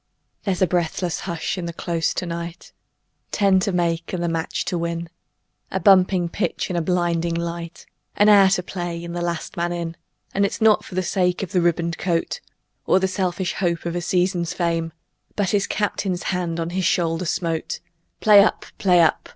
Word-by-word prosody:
There's 190 -2 +1
a - - +4
breathless 175 0 -1
hush 170 +2 -2
in 175 - -4
the 170 - -5
Close 165 -1 -1
to - - -2
night 170 0 -6 0.6
Ten 195 -2 +3
to 200 - 0
make 170 -2 -1
and 175 -1 -1
the - - 0
match 165 -1 -2
to - - -2
win 170 0 -3 0.6
A 190 - -2
bumping 185 -1 +4
pitch 195 +2 -2
and 175 - -1
a - - 0
blinding 170 -1 0
light, 170 0 -5 0.3
An 205 - +4
hour 200 -2 +7
to 185 -1 +1
play 175 -2 -5
and 170 0 -6
the 175 - -2
last 170 -1 -3
man 170 0 0
in. 170 -1 -4 0.4
And 200 - +2
it's 200 - -1
not 220 -2 +4
for 185 - -10
the 185 - +1
sake 180 0 0
of 195 - -6
a 180 - +3
ribboned 170 -1 0
coat 170 - -1 0.5
Or 185 - +5
the 190 - +1
selfish 185 -1 -1
hope 170 -3 -1
of 170 0 -2
a 175 - -1
season's 180 0 0
fame, 165 -2 -1 0.4
But 200 -3 0
his 200 -1 +1
Captain's 195 -3 -1
hand 170 -2 -2
on 165 0 -2
his 185 0 -1
shoulder 165 +1 +1
smote; 165 -1 -2 0.4
"Play 205 -2 +8
up! 215 - 0
Play 180 -3 +5
up! 160 - +2
175 Hz, 195 wpm, -22 LUFS, 170-185 Hz, 0.6 s, Play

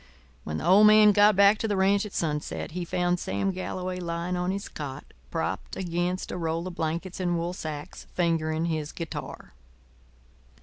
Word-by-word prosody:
When 80 0 -4
the - - -4
old 200 +4 +7
man 215 0 +7
got 205 +1 +5
back 200 +2 +6
to 225 - -1
the 205 -2 0
ranch 200 +2 +3
at 205 - -13
sunset 150 -1 -2
he 175 +2 -4
found 175 +1 0
Sam 100 - -1
Galloway 185 0 -4
lying 170 +1 -3
on 180 0 -1
his 200 +1 -3
cot, 140 -3 -6 0.3
propped - - -3
against 180 0 -2
a - - -4
roll 165 0 -2
of 185 - -5
blankets 170 +3 -3
and 175 -2 0
wool 170 +1 -2
sacks, 150 -4 -7
fingering 165 -2 +1
his 155 -3 -2
guitar. 165 -2 -7
175 Hz, 175 wpm, -27 LUFS, 165-190 Hz, 0.3 s, old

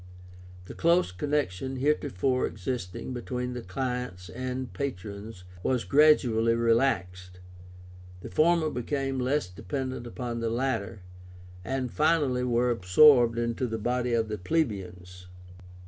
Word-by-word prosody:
The - - -9
close 170 - +2
connection 130 +1 -2
heretofore 130 -3 0
existing 105 +1 -5
between 125 0 -4
the 125 - -5
clients 125 -3 -4
and 130 0 -5
patrons 105 -6 -6 0.2
was 125 +4 0
gradually 125 -6 +4
relaxed, 95 -7 0 0.8
the - - -8
former 160 0 +3
became 135 +1 -2
less 130 -1 0
dependent 130 +6 -5
upon 120 0 -5
the 115 -1 -1
latter, 115 -5 -2 0.6
and 130 +2 -3
finally 150 -5 +2
were 120 0 +2
absorbed 120 +4 +5
into 120 +2 -1
the 115 -1 -3
body 125 +2 -1
of 115 -1 +1
the 105 -1 -4
plebeians. 90 - -3
125 Hz, 115 wpm, -28 LUFS, 105-135 Hz, 0.8 s, absorbed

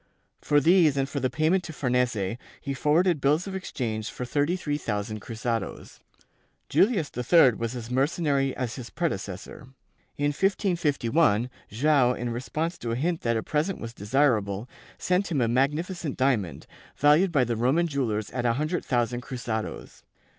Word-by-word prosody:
For 145 -1 +3
these 160 -2 +4
and 135 0 +1
for 140 +1 -3
the 130 -1 0
payment 155 +7 +1
to 160 - -7
Farnese, 125 -6 0 0.2
he 140 - -4
forwarded 155 +4 +2
bills 150 +6 +2
of 195 - -6
exchange 115 - -3
for 125 - -5
thirty 145 +7 +1
three 150 -5 -2
thousand 105 -2 -3
cruzados. 115 -1 -4 0.7
Julius 195 -8 +2
III 130 +3 +5
was 115 +2 -4
as 120 -1 -7
mercenary 135 0 +1
as 125 -2 -3
his 125 -2 -7
predecessor. 125 - -4 0.5
In 145 0 +1
1551 150 - +1 0.2
Joao, 130 +2 +3
in 120 -1 -3
response 155 +8 -3
to 115 - -4
a 115 - 0
hint 165 +6 -1
that 115 -1 +1
a 110 - -2
present 155 +5 -1
was 115 0 -7
desirable, 110 -2 +1 0.3
sent 180 +1 0
him 150 - +1
a 120 - +2
magnificent 150 +6 -1
diamond, 125 -10 0 0.3
valued 150 +6 +4
by 140 -6 +3
the 120 -1 -1
Roman 130 +9 +2
jewellers 115 -8 -2
at 125 - -3
a 120 -1 +2
hundred 155 +7 -1
thousand 120 -1 0
cruzados. 120 -4 -5
135 Hz, 160 wpm, -26 LUFS, 120-155 Hz, 0.7 s, III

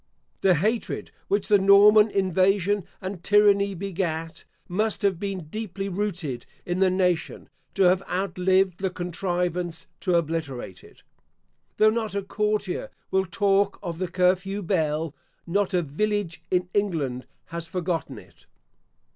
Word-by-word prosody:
The 185 -2 +5
hatred 215 +8 -1 0.2
which 200 0 0
the 205 -1 +5
Norman 205 +2 +7
invasion 195 0 +2 0.2
and 190 -2 -6
tyranny 200 -1 +4
begat, 165 -4 -4 0.2
must 215 +4 -1
have 195 -4 +2
been 195 -4 -4
deeply 200 +2 -5
rooted 175 -10 -3 0.2
in 175 +1 -2
the 190 -1 +4
nation, 180 -2 -1 0.3
to 195 - +3
have 180 +1 +4
outlived 185 0 +1
the 190 -1 0
contrivance 175 -1 -2
to 180 -2 +1
obliterate 150 - -3
it. - - -18 0.7
Though 215 0 +5
not 220 -2 -2
a 200 - -1
courtier 210 -1 -1 0.2
will 190 0 +1
talk 200 +1 +2
of 170 -1 -5
the 185 - -1
curfew 185 +3 +1
bell, 160 -4 0 0.3
not 200 +3 0
a 180 -2 +1
village 195 +3 -2
in 180 -1 +1
England 155 -11 -1 0.3
has 170 0 -4
forgotten 175 -3 -3
it. - - -17
185 Hz, 135 wpm, -25 LUFS, 170-200 Hz, 0.7 s, Norman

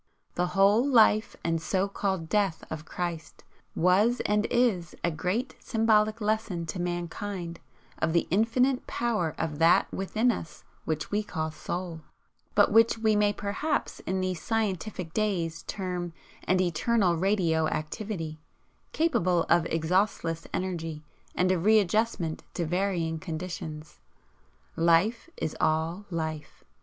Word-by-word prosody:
The 180 0 0
whole 200 +4 +5
life 225 -5 +4
and 165 -1 0
so 190 +3 0
called 190 -4 -2
'death' 200 -3 0
of 155 0 -5
Christ 170 -2 -5 0.3
was 200 +8 +3
and 210 +1 +2
is 215 -10 +1
a 170 - +2
great 185 - -2
symbolic 220 -1 +2
lesson 210 -5 -1
to 180 - -4
mankind 175 0 -4 0.4
of 160 - +1
the 170 0 +2
infinite 250 +6 +2
power 215 -10 -1
of 155 -2 -3
THAT 165 +2 +4
within 220 +5 +1
us 165 -7 -7 0.2
which 155 -1 -2
we 210 +1 +1
call 160 -6 -3
SOUL, 170 +1 -5 0.5
but 205 0 +5
which 225 +1 +5
we 220 -1 +2
may 210 0 +3
perhaps 205 +10 -2
in 190 0 -2
these 185 -2 -2
scientific 200 -5 -2
days 175 -7 -1
term 180 -3 -3 0.3
an 185 0 +2
eternal 185 +2 +2
radio 170 -3 +2
activity, 160 0 -4 0.5
capable 180 - +2
of 170 -1 +4
exhaustless 165 0 0
energy 165 -4 -3 0.3
and 185 +1 +2
of 175 -3 0
readjustment 210 -5 +2
to 175 - -1
varying 175 -2 -1
conditions. 160 -2 -6 0.8
Life 170 - +2
is 160 - -3
all 160 +5 0
Life. 160 -3 -5
185 Hz, 130 wpm, -28 LUFS, 165-210 Hz, 0.8 s, whole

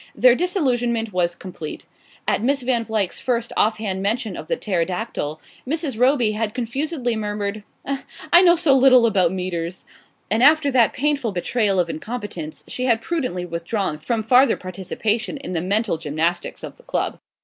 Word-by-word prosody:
Their 250 0 +6
disillusionment 245 - 0
was 175 -1 +1
complete. 170 -5 -8 0.4
At - - +1
Miss 270 +3 +1
Van 240 -2 +1
Vluyck's 215 -5 -1
first 235 -2 -1
off 215 +1 +2
hand 195 -3 -3
mention 220 +2 -1
of - - -8
the - - -1
pterodactyl 180 - -2 0.3
Mrs. 285 -5 -2
Roby 250 -3 +3
had 215 0 -2
confusedly 255 +1 -2
murmured: 210 -1 -3 0.2
"I 280 +5 +1
know 350 -2 +6
so 315 -5 +4
little 255 -2 +6
about 190 -6 +3
metres 180 -1 -4 0.2
" - - -41
and 220 +2 +2
after 290 +1 +5
that 245 -4 +4
painful 280 -6 0
betrayal 195 +1 +1
of 175 - +2
incompetence 165 - -6
she 255 - -3
had 230 -3 +3
prudently 250 - -2
withdrawn 170 0 -3
from 220 +8 -1
farther 250 +3 +5
participation 205 +7 -3
in 270 -9 -6
the 165 - -1
mental 200 -1 0
gymnastics 165 +3 -2
of - - -8
the - - -20
club. - - -2
220 Hz, 165 wpm, -22 LUFS, 185-255 Hz, 0.4 s, Their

